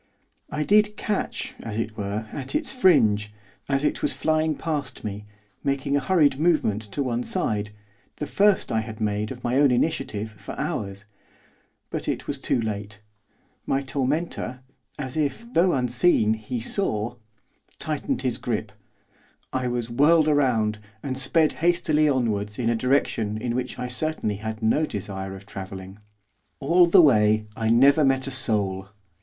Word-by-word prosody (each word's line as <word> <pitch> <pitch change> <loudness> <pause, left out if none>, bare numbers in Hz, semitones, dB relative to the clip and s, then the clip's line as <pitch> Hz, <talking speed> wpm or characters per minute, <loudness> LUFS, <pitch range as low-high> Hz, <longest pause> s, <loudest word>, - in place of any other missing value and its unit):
I 150 0 -2
did 210 +4 +3
catch, 210 -2 -2
as 110 -2 -5
it 115 -1 -3
were, 105 +1 -3
at 140 - -4
its 300 -4 0
fringe, 110 - +4 0.4
as 135 0 +1
it - - 0
was - - 0
flying 155 0 +1
past 150 -5 -4
me, 105 0 -6 0.4
making 140 0 0
a - - +3
hurried 145 -2 +3
movement 155 -11 +2
to 140 - 0
one 120 -2 -1
side, 105 -3 -1 0.5
the 150 - -4
first 200 +6 +2
I 110 - +2
had 110 0 -8
made, 105 0 -1
of 125 -1 -8
my 120 +2 +1
own 145 0 +5
initiative, 120 -5 -1
for 105 - -9
hours. 100 0 -3 0.9
But - - -4
it - - -2
was - - -2
too - - 0
late. 105 -2 -4 0.7
My 135 - +1
tormentor, 135 -1 -2 0.4
as 130 0 -5
if, 150 - -1
though 175 +1 +4
unseen, 125 -2 +3
he 110 +3 -4
saw 115 - -1 0.6
tightened - - -2
his - - -1
grip, - - -3 0.8
I 130 -1 0
was 120 -1 -2
whirled 150 +6 +5
round, 120 -8 +2 0.2
and 135 -2 -3
sped 150 +4 +3
hastily 165 -3 +3
onwards 105 -6 0
in 120 -2 +1
a - - +1
direction 115 -4 0
in 120 +2 -2
which 125 +1 -3
I 125 - -3
certainly 125 -4 -1
had 110 +1 -6
no 150 +8 +2
desire 95 -2 -5
of 95 0 -12
travelling. 95 0 -8 0.6
All 170 +5 +4
the 175 +1 +7
way 110 -6 +4
I 110 -1 -1
never 140 +6 +5
met 135 -1 +2
a 135 - -5
soul. 100 -7 0
125 Hz, 160 wpm, -25 LUFS, 110-150 Hz, 0.9 s, the